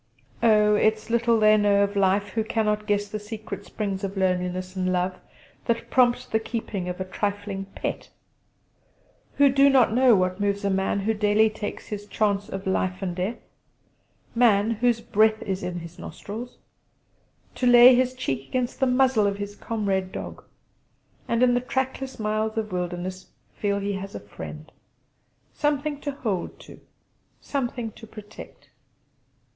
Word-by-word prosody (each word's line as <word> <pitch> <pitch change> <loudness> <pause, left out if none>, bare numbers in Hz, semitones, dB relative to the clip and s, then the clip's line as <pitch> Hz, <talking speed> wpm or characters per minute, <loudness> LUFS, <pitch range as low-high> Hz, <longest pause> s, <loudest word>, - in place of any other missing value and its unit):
Oh, 210 -2 +5
it's 215 +1 +1
little 235 -1 +3
they 215 0 +6
know 205 -1 +4
of 200 0 -2
life 200 +1 +2
who 220 +2 -1
cannot 210 -1 -1
guess 205 -1 +1
the 215 +1 -5
secret 210 -2 -7
springs 200 -2 -4
of 195 0 -4
loneliness 185 0 -1
and 185 -1 0
love 185 0 -1 0.5
that 235 -1 -1
prompt 245 -2 +3
the 220 - +2
keeping 220 -5 -4
of 180 - -5
a 185 - -2
trifling 200 0 -3
pet; - - -4 1.3
who 285 - +6
do 275 +1 +5
not 260 -5 +4
know 250 -1 +5
what 185 0 0
moves 200 0 0
a 200 - +2
man 190 +1 0
who 220 +3 +1
daily 210 +1 +3
takes 210 -1 -6
his 205 -1 -6
chance 205 -2 0
of 195 0 -6
life 185 0 -1
and 180 -2 -2
death 190 +6 -2 1.0
man 225 -3 +4
whose 230 +1 +1
"breath 220 0 +3
is 190 -1 -3
in 180 -1 -4
his 170 +1 -11
nostrils" 230 +5 -8 1.0
to 250 - 0
lay 245 +1 +9
his 255 +1 +2
cheek 135 - -3
against 250 -1 -2
the 265 - +3
muzzle 250 -4 +3
of 200 0 -1
his 205 0 -6
comrade 195 -5 -2
dog, - - -7 0.8
and 235 +1 +2
in 245 -1 +5
the 245 - +1
trackless 265 +1 -3
miles 215 +1 -1
of 215 -2 -2
wilderness 180 +1 -4 0.3
feel 200 -1 -1
he 200 0 -2
has 195 +1 -6
a - - -4
friend. 155 0 -10 0.8
Something 295 0 -1
to 290 - -3
hold 215 -10 -3
to; - - -13 0.6
something 245 -4 -3
to 225 - -13
protect. 210 - -12
210 Hz, 160 wpm, -25 LUFS, 195-230 Hz, 1.3 s, lay